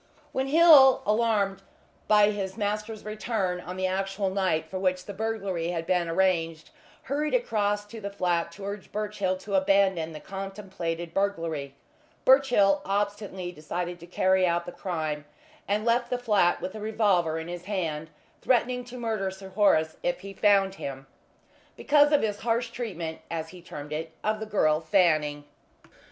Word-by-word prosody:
When 265 0 -1
Hill, 295 -3 +7
alarmed 210 -3 +1 0.5
by 210 -1 +5
his 195 -1 -4
master's 210 +1 -3
return 215 -4 -2
on 180 +1 -7
the 185 - -1
actual 195 +1 -1
night 185 -5 0
for 190 - -5
which 185 -1 0
the 205 - -7
burglary 200 -5 -2
had 170 -1 -3
been 175 -2 +1
arranged, 165 -3 0 0.3
hurried 295 - -1
across 205 - 0
to 220 +1 -10
the 200 - -4
flat 175 -4 -1
to 195 - -9
urge 200 0 -6
Birchill 205 -3 -2
to 200 +2 -8
abandon 190 -4 +2
the 155 - -8
contemplated 190 -4 -5
burglary, 165 -8 -2 0.5
Birchill 245 -8 +5
obstinately 200 -2 -2
decided 175 +2 -5
to 170 - -12
carry 185 +1 +2
out 170 0 0
the - - -6
crime, 155 -6 -4 0.4
and 210 +2 0
left 240 +1 +2
the 250 - 0
flat 210 -8 +2
with 185 - -4
a 220 - -7
revolver 200 -7 +1
in 160 0 -5
his 175 0 -7
hand, 165 -6 -3 0.3
threatening 250 0 +1
to 245 +1 -9
murder 220 -5 -1
Sir 190 0 -10
Horace 185 -5 +2
if 175 0 -1
he 195 0 -8
found 195 -2 +3
him, 135 -1 -6 0.7
because 295 0 +4
of 295 - +4
his 210 -1 -1
harsh 230 0 -1
treatment 175 -10 -5
as 160 -1 -4
he 180 0 -12
termed 150 -3 -8
it 160 +1 -4
of 215 0 0
the 220 - -5
girl 155 -7 +2
Fanning. 155 -4 +2
195 Hz, 165 wpm, -27 LUFS, 175-215 Hz, 0.7 s, Hill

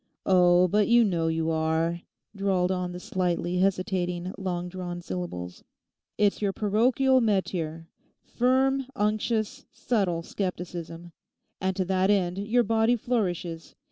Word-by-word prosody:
'Oh, 180 -1 +5
but 210 +3 +2
you 235 0 +6
know 170 -6 0
you 160 0 0
are,' 160 +2 0 0.3
drawled 190 -2 +1
on 180 -1 -2
the 180 - -7
slightly 180 -1 -1
hesitating 185 -1 -1
long 180 -2 -3
drawn 180 -1 -6
syllables; 170 - -6 0.5
'it's 205 0 +2
your 200 -2 +1
parochial 250 +6 +2
métier_. 175 -7 -1 0.4
Firm, 265 +2 +1
unctuous, 215 +4 -1
subtle, 185 -8 -1
scepticism; 175 -2 -5 0.5
and 190 0 0
to 185 - -1
that 190 +1 +1
end 190 -2 +1
your 225 +4 +2
body 225 +2 +2
flourishes. 180 -9 -3
185 Hz, 125 wpm, -27 LUFS, 175-210 Hz, 0.5 s, you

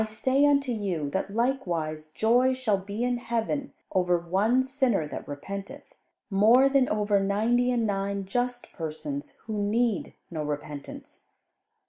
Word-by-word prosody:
"I - - +1
say 260 +6 +2
unto 280 -2 +2
you, 185 -10 -2
that 195 +3 -2
likewise 170 -12 -1
joy 240 +10 +3
shall 220 -6 +1
be 200 +4 -4
in 245 0 +1
heaven 240 +4 -2 0.2
over 180 -2 +2
one 200 +9 +2
sinner 260 - +1
that - - -7
repenteth, 200 - -7 0.4
more 225 +7 +6
than 270 -2 +3
over 210 -1 +2
ninety 220 +5 +2
and 240 -2 +1
nine 200 -1 -1
just 245 +4 -2
persons 280 - -5
which 220 -1 -4
need 210 0 0 0.2
no 160 -2 -3
repentance. 145 -1 -7
215 Hz, 140 wpm, -27 LUFS, 190-250 Hz, 0.4 s, more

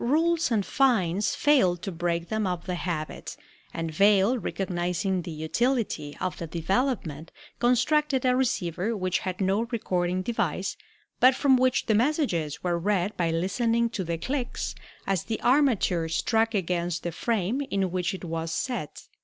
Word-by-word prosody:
Rules 320 +5 +2
and 215 -5 +1
fines 210 -8 +2
failed 190 - +3
to 195 - -3
break 170 0 -2
them 220 -2 0
of 180 -2 -3
the 185 - -2
habit, 170 -3 -4 0.3
and 165 -1 -4
Vail, 200 +6 +4
recognizing 180 -3 -2
the 170 - -7
utility 160 - -1
of 185 - -3
the 170 - -4
development, 170 - -1 0.3
constructed 260 +3 +2
a 250 0 +4
receiver 220 -4 -1
which 185 -1 0
had 185 -1 -4
no 195 +2 +2
recording 185 -6 -1
device, 235 +3 -1 0.4
but 255 +1 +6
from 270 0 +4
which 255 0 +2
the 220 - +2
messages 220 - 0
were 175 -1 0
read 200 +1 0
by 170 -2 0
listening 230 +7 +1
to 205 -5 -3
the 170 -1 -2
clicks 255 - -3 0.3
as 195 -3 -1
the 225 -2 -3
armature 240 - +2
struck 225 +6 +1
against 175 -2 -1
the 175 - -2
frame 225 - -1
in 190 -2 0
which 180 +1 -1
it 185 - -8
was 165 0 -3
set. 225 - -3
195 Hz, 155 wpm, -27 LUFS, 175-240 Hz, 0.4 s, but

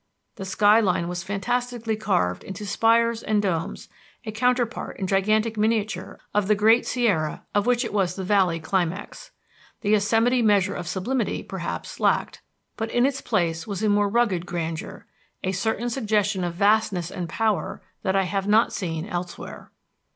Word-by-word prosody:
The 195 - -5
sky 205 +3 +4
line 180 -5 +1
was 175 0 -3
fantastically 230 +4 -2
carved 90 - 0
into 195 +2 -7
spires 230 +2 +2
and 215 -2 +1
domes, 180 -5 -2 0.4
a 215 - -4
counterpart 245 +1 0
in 195 - -2
gigantic 215 +4 +1
miniature 220 0 -1
of 210 -2 +1
the 210 - +4
Great 220 +3 +4
Sierra 200 -12 0
of 205 +2 +1
which 245 0 +2
it 230 - -5
was 185 -4 +1
the 190 - -4
valley 185 -3 +2
climax. 190 - -3 0.5
The 205 - 0
Yosemite 225 +4 +3
measure 205 -3 +3
of 175 - -5
sublimity, 210 +7 -1
perhaps, - - -6
lacked, - - +1 0.4
but 225 -1 -2
in 240 +2 +2
its 270 -1 -1
place 165 +3 -1
was 200 0 -4
a 215 - +3
more 205 0 +3
rugged 200 -6 +1
grandeur, 165 +2 -5 0.4
a 185 - 0
certain 220 +5 -1
suggestion 210 -6 0
of 175 -1 -3
vastness 200 -3 +2
and 175 -2 -5
power 215 +3 -1 0.2
that 190 - 0
I 195 - +3
have 195 +2 -2
not 215 +3 +4
seen 165 -4 -3
elsewhere. 175 -3 -6
205 Hz, 165 wpm, -24 LUFS, 185-225 Hz, 0.5 s, sky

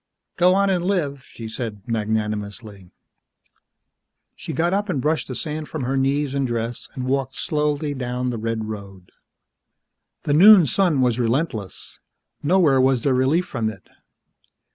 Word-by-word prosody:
"Go 180 +1 +4
on 200 0 +3
an' 180 -2 +1
live," 160 -8 -1
she 115 - -9
said 110 -3 -6
magnanimously. 105 -3 -3 1.5
She - - -7
got 165 +5 0
up 205 +1 -1
and 150 - 0
brushed 150 -3 0
the 130 - -5
sand 155 +1 -4
from 155 -4 -4
her 130 +2 -1
knees 135 +1 0
and 140 -1 0
dress, 115 0 -4
and 130 - -4
walked 135 0 -1
slowly 150 -1 -1
down 125 -1 -3
the 115 - -4
red 115 0 -2
road. 100 -4 -9 1.1
The 145 - 0
noon 190 +3 +8
sun 155 0 +2
was 125 -1 +1
relentless; 115 - -2 0.4
nowhere 150 -5 +3
was 130 -2 +2
there 135 - +2
relief 135 +8 +2
from 115 -9 -2
it. 100 -4 -12
130 Hz, 150 wpm, -22 LUFS, 115-155 Hz, 1.5 s, noon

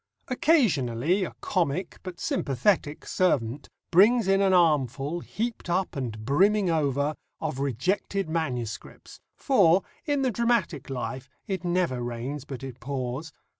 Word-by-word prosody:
Occasionally 185 - +2
a - - -5
comic, 175 -1 -1
but 185 -2 -8
sympathetic, 160 - 0
servant 140 -7 0 0.2
brings 210 +5 +5
in 195 0 +4
an 195 -1 +3
armful 150 -3 +2
"heaped 225 +2 -4
up 180 0 0
and 115 -5 -4
brimming 190 - +3
over" 145 -2 +1 0.3
of 155 -4 -3
rejected 160 - -1
MSS., 125 -9 -4 0.2
for, 195 - +4 0.2
in 285 -2 +1
the 255 - +2
dramatic 220 - 0
life, 130 0 -4 0.2
it 190 -2 -3
never 175 -8 0
rains 120 +4 -4
but 135 -2 -7
it 130 -2 -7
pours. 135 +4 -4
160 Hz, 130 wpm, -27 LUFS, 135-195 Hz, 0.3 s, brings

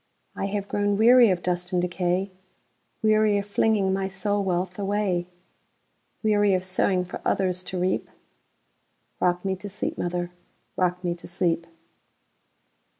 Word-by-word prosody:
I - - -2
have 200 0 -3
grown 205 0 0
weary 240 +1 +7
of 180 -2 0
dust 180 0 -2
and 180 - +1
decay,—Weary 190 +4 -1
of 200 - -2
flinging 205 -2 +2
my 195 0 -1
soul 200 +1 -1
wealth 180 0 -2
away; 195 -3 0 1.0
Weary 205 -2 +3
of 185 0 -2
sowing 185 0 +1
for 180 - -7
others 185 -2 0
to 185 - -4
reap;—Rock 180 0 -5
me 190 -1 0
to 205 +2 -7
sleep, 200 - -4
mother,—rock 175 -1 -3
me 175 -1 0
to 170 - -11
sleep! 170 -2 -1
185 Hz, 130 wpm, -25 LUFS, 180-205 Hz, 1.0 s, weary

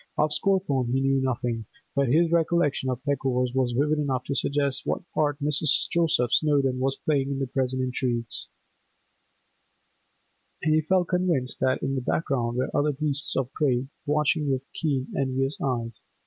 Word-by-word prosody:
Of 150 0 +2
Scawthorne 150 -11 +1
he 130 - +2
knew 135 0 +2
nothing, 120 -3 -2 0.3
but 140 -1 +2
his 165 +3 +3
recollection 165 -5 +1
of 125 -2 -2
the 145 - +1
Peckovers 125 -2 0
was 130 -2 0
vivid 150 +2 +2
enough 135 -4 -1
to 140 - -3
suggest 140 -1 0
what - - -2
part 145 -2 +1
Mrs. 150 0 +2
Joseph 155 -8 +2
Snowdon 140 -4 +2
was 135 +1 0
playing 140 -3 +1
in 140 - -2
the 135 - -1
present 130 0 -1
intrigues, 120 -2 -2 2.2
and 155 - +3
he 155 - +4
felt 180 +2 +1
convinced 175 -8 0
that 130 0 +1
in 135 - 0
the 135 - -1
background 125 -4 -1
were 130 - -2
other 150 +1 +2
beasts 145 0 0
of 135 +1 -1
prey, 135 -4 0 0.2
watching 150 0 +1
with 130 -1 0
keen, 140 -5 -2
envious 135 +1 -1
eyes. 120 -4 -2
135 Hz, 165 wpm, -26 LUFS, 130-150 Hz, 2.2 s, he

